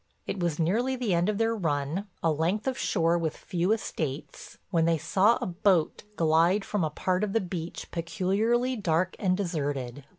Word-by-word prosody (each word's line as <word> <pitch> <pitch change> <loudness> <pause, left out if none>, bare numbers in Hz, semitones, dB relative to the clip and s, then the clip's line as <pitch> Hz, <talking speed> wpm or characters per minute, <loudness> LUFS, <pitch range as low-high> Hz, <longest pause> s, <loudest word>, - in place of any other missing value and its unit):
It - - -4
was 170 -4 0
nearly 225 +11 +1
the 240 -7 -1
end 175 +3 +2
of 210 - 0
their 225 +1 +1
run, 160 +1 -1 0.2
a 165 - +3
length 170 +8 0
of 260 - 0
shore 170 -8 +1
with 160 -2 -2
few 180 +2 -1
estates, 155 -10 -4
when 165 -3 +3
they 165 -1 +3
saw 190 +8 +3
a - - -2
boat 180 -2 +1
glide 165 +4 +3
from 205 -4 -1
a 155 - +1
part 185 +5 -1
of 205 -2 -1
the 225 - +3
beach 175 -3 -6
peculiarly 210 +9 0
dark 185 -3 0
and 185 -3 +1
deserted. 145 -8 -3
180 Hz, 185 wpm, -28 LUFS, 160-205 Hz, 0.2 s, a